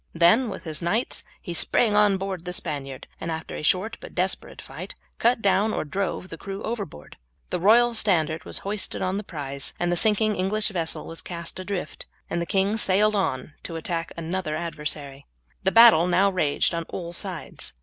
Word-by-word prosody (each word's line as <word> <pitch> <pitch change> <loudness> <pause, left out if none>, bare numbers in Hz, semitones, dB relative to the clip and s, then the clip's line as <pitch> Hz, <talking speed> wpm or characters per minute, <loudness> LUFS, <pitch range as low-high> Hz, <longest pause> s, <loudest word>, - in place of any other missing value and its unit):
Then 195 +9 +5
with 195 - -7
his 160 -2 -4
knights 205 +9 +1 0.2
he 175 - -5
sprang 215 +5 +3
on 205 -2 +5
board 190 -3 -4
the 180 0 -4
Spaniard, 140 -6 -4
and 165 - -4
after 160 0 -4
a - - -5
short 190 +8 +1
but - - -11
desperate 185 +1 -1
fight - - -8 0.2
cut 235 0 +3
down 200 +2 +3
or - - -2
drove 185 +3 -3
the 165 - -8
crew 195 0 -6
overboard. 200 - -6 0.3
The 180 - 0
royal 235 +6 +5
standard 165 -8 +1
was - - -3
hoisted 205 0 -1
on 185 +1 0
the 210 - -3
prize, 140 -6 -3
the 175 0 +1
sinking 215 +3 +2
English 210 +4 +1
vessel 170 -5 -2
was 165 - -5
cast 170 0 -6
adrift, 185 -4 -5 0.2
and 170 - 0
the 170 - -3
king 195 +3 +1
sailed 210 +1 +3
on 150 -7 -1
to 165 - -7
attack 165 0 -2
another 170 -1 -2
adversary. 150 -4 -4 0.3
The - - +2
battle 225 -8 +8
now 195 +2 +4
raged 160 -3 +1
on 170 0 -2
all 170 -2 -5
sides. - - -3
180 Hz, 185 wpm, -25 LUFS, 165-205 Hz, 0.3 s, battle